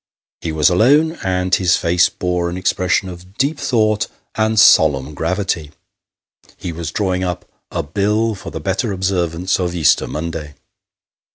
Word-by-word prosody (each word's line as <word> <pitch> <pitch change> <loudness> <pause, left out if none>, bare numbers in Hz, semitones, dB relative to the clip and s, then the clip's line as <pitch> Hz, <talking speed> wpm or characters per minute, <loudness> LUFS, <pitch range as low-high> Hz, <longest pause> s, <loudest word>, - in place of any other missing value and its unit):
He 80 - -4
was 80 0 +3
alone, 145 - +3
and 90 -1 -1
his 90 -2 +3
face 85 +1 +2
bore 90 -1 -2
an 90 - -5
expression 95 0 0
of 90 +2 -11
deep 140 +3 0
thought 110 -3 +1 0.3
and 110 0 +1
solemn 75 -7 +5
gravity 85 -2 -2 0.8
he 90 - -5
was 85 0 -5
drawing 95 -3 -1
up 90 -2 -3
" - - -54
A - - -2
Bill 105 +8 0
for 95 - -8
the - - -6
better 100 +4 -1
observance 90 -1 -1
of 90 -1 -2
Easter 80 -5 +3
Monday." 75 -2 -5
90 Hz, 155 wpm, -18 LUFS, 85-105 Hz, 0.8 s, solemn